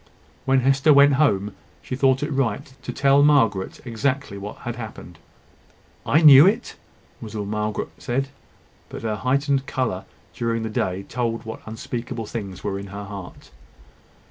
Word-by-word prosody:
When 135 0 +3
Hester 135 +3 +3
went 140 0 +6
home, 100 -8 +1 0.3
she 130 - -4
thought 135 +1 +2
it 150 - -3
right 135 +1 -2
to - - -5
tell 140 0 +3
Margaret 115 -10 +2
exactly 130 0 -2
what 100 +1 -7
had 120 0 -3
happened. 110 -7 -9 0.9
"I 155 - +4
knew 145 +2 +10
it?" 225 +5 0 0.5
was 110 -1 -8
all 105 -1 -3
that 100 - -6
Margaret 105 0 -2
said; 135 +3 -2 0.6
but - - -8
her 110 -2 -2
heightened 135 +3 0
colour 105 -8 -2 0.3
during 115 -1 -2
the 110 - -4
day 95 -2 -2
told 115 +1 -3
what 110 - -7
unspeakable 115 +1 -5
things 100 -5 -6
were 100 -1 -2
in 100 - -8
her 100 +1 -7
heart. 100 -2 -10
120 Hz, 160 wpm, -23 LUFS, 105-135 Hz, 0.9 s, knew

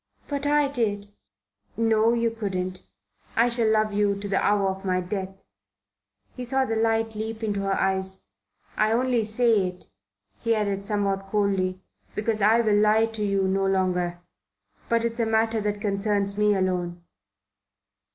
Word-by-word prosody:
"But 285 0 -2
I 295 0 +3
did." 210 -7 -2 0.7
"No, 225 0 +3
you 230 -1 +1
couldn't. 185 -4 -4 0.5
I 235 +2 +4
shall 235 -2 +1
love 215 -1 +2
you 205 -1 +2
to 200 +1 -5
the 195 -1 0
hour 200 -1 +2
of 190 +1 -8
my 185 -1 0
death." 190 +1 -5 0.9
He 250 - -5
saw 265 +2 +1
the 225 -3 -2
light 225 0 +1
leap 220 +1 -5
into 205 -2 -1
her 195 0 -1
eyes. 190 0 -1 0.5
"I 215 +1 +3
only 250 0 +2
say 220 -2 +2
it," 180 - -10 0.5
he 230 -1 +1
added 200 -2 -2
somewhat 195 -2 -1
coldly, 195 -3 0 0.3
"because 215 0 -1
I 220 +3 +5
will 215 -2 +2
lie 215 +1 +4
to 225 -1 -5
you 200 -1 +1
no 195 0 +1
longer. 180 -2 0 0.7
But 230 0 +2
it's 230 +1 -2
a 230 - +2
matter 225 0 +1
that 205 0 -2
concerns 200 -1 0
me 210 0 +3
alone." 180 -2 -2
210 Hz, 160 wpm, -25 LUFS, 195-225 Hz, 0.9 s, I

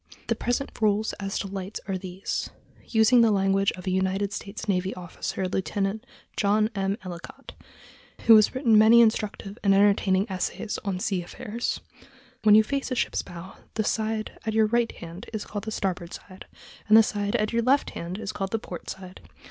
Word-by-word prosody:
The - - +2
present 245 +3 -2
rules 215 0 +2
as 195 0 -3
to 200 - -3
lights 195 +1 -5
are 195 - -1
these—using 215 +5 0
the 230 - +5
language 195 -1 +2
of 180 - -10
a 185 - -1
United 190 +2 0
States 210 +2 -6
navy 190 -1 0
officer, 180 +1 -4
Lieut. 195 +3 -2 0.3
John 215 +2 +2
M. 195 0 -1
Ellicott, 175 -2 -9 0.7
who 225 - +8
has 215 +3 +5
written 235 -5 +4
many 225 +2 +7
instructive 215 -2 0
and 195 -1 +4
entertaining 200 0 +3
essays 190 +2 -3
on 195 -2 -2
sea 190 -1 -1
affairs: 230 +6 -4 0.6
When 210 -1 +6
you 220 - +7
face 275 +5 -2
toward 260 - -2
a - - +2
ship's - - 0
bow 175 +1 -10 0.2
the 220 - +1
side 220 0 -2
at 220 0 -2
your 220 -1 +5
right 235 +2 +1
hand 170 +2 -10
is 215 - -4
called 205 0 -6
the 220 - -4
starboard 180 -4 -3
side, 185 -1 -13 0.4
and 215 +1 +7
the 225 - +8
side 205 -1 -2
at 215 +1 0
your 235 - +2
left 265 +4 +2
hand 175 +3 -5
is 215 -1 -4
called 195 -2 -3
the 225 - 0
port 180 -5 -8
side. 185 -1 -9
205 Hz, 190 wpm, -26 LUFS, 190-220 Hz, 0.7 s, who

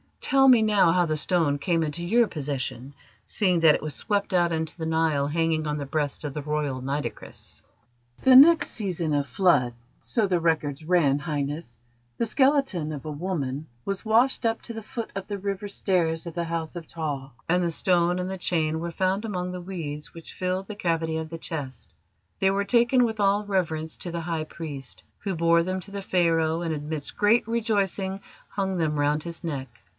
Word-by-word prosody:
Tell 270 0 +4
me 250 -4 +7
now 210 -6 +4
how 180 -1 +3
the 155 -1 -1
stone 155 -3 +1
came 165 +1 +1
into 160 +3 -3
your 235 +5 +4
possession, 140 - -4 0.3
seeing 185 -5 +1
that 160 -2 +6
it - - -4
was 155 -1 -2
swept 205 +4 -1
out 175 -1 +3
into 160 -1 -2
the 160 - -4
Nile 160 -3 +1
hanging 160 0 0
on 150 0 -1
the 145 - -4
breast 145 +1 -2
of 145 -2 -4
the 150 - -4
Royal 145 -3 -2
Nitocris." 140 +3 -5 0.6
"The 260 -1 +7
next 315 +5 +8
season 175 -7 -2
of 145 -1 0
Flood, 135 -5 +3 0.3
so 225 -4 +1
the 185 -3 +1
records 155 -3 0
ran, 155 -5 +3
Highness, 145 -4 -4 0.4
the - - +1
skeleton 265 - +2
of 145 -1 -7
a 155 - -4
woman 150 -3 -3 0.2
was 195 +2 -4
washed 235 +3 +3
up 225 0 +1
to 230 - -7
the 225 - -6
foot 225 +1 -6
of 195 -1 -5
the 205 - -3
river 200 +1 -3
stairs 175 -4 0
of 170 - -6
the 170 0 -2
House 165 0 -3
of 165 -2 -8
Ptah, 145 -5 -4 0.2
and 180 +1 +3
the 170 - +1
stone 175 +1 +2
and 185 +1 -3
chain 160 -3 0
were 170 +1 -3
found 190 +5 0
among 180 -4 -3
the 180 0 -6
weeds 160 -5 -6
which 165 -1 -11
filled 185 +1 -2
the 210 - -6
cavity 165 -4 -1
of 160 0 -4
the 165 - -6
chest. 145 -5 -5 0.5
They 190 - +3
were 200 +1 +1
taken 240 +4 +4
with 220 -2 -1
all 200 +1 +2
reverence 165 -5 -1
to 175 - -6
the 170 0 -3
High 160 -1 -2
Priest, 145 -5 -8 0.2
who 195 -2 -3
bore 170 0 +4
them 185 +2 -2
to 200 - -10
the 200 0 -4
Pharaoh, 165 -3 +1
and, 165 -2 -1
amidst 150 0 -4
great 215 +3 +4
rejoicing, 200 -4 -1 0.3
hung 190 -2 -2
them 155 -3 0
round 145 +1 +1
his 170 0 -6
neck. 140 -5 -3
170 Hz, 200 wpm, -26 LUFS, 155-195 Hz, 0.6 s, next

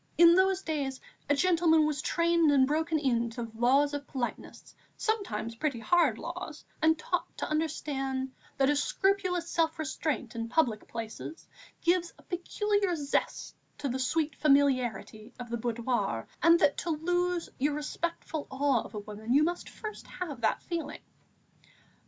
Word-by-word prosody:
In 340 0 +8
those 380 +1 +3
days 280 -4 -2 0.3
a 290 - +4
gentleman 330 -1 +4
was 300 -1 -1
trained 335 -1 +3
and 270 -2 +5
broken 320 +3 0
in 240 -5 +1
to 235 +1 -5
the 225 - -8
laws 270 +5 +3
of 285 -1 -4
politeness, 255 -3 -5 0.2
sometimes 305 - -2
pretty 255 +1 -2
hard 280 0 +3
laws, 335 -3 -7 0.2
and 320 0 +4
taught 355 +3 -2
to - - -2
understand 275 -4 -2 0.3
that 270 +1 +4
a - - +2
scrupulous 365 +2 +1
self 330 -1 +1
restraint 300 -5 -2
in 230 0 -3
public 240 -5 +1
places 230 +8 -7 0.3
gives 345 0 +1
a - - -19
peculiar 395 +1 0
zest 285 -3 -2 0.2
to 280 - -3
the 255 +2 -2
sweet 295 +3 0
familiarity 255 -6 +1
of 240 -1 -7
the 235 - 0
boudoir, 230 - -1
and 335 +1 +7
that 285 - +4
to 345 - -3
lose 350 +2 0
your 290 +2 +1
respectful 315 0 -4
awe 270 -3 +2
of - - -10
a - - -2
woman, 215 +4 -3
you 295 - +6
must 350 +2 -2
first 430 -1 -8
have 295 -9 -6
that 220 - +1
feeling. 325 -4 -4
295 Hz, 160 wpm, -30 LUFS, 255-335 Hz, 0.3 s, In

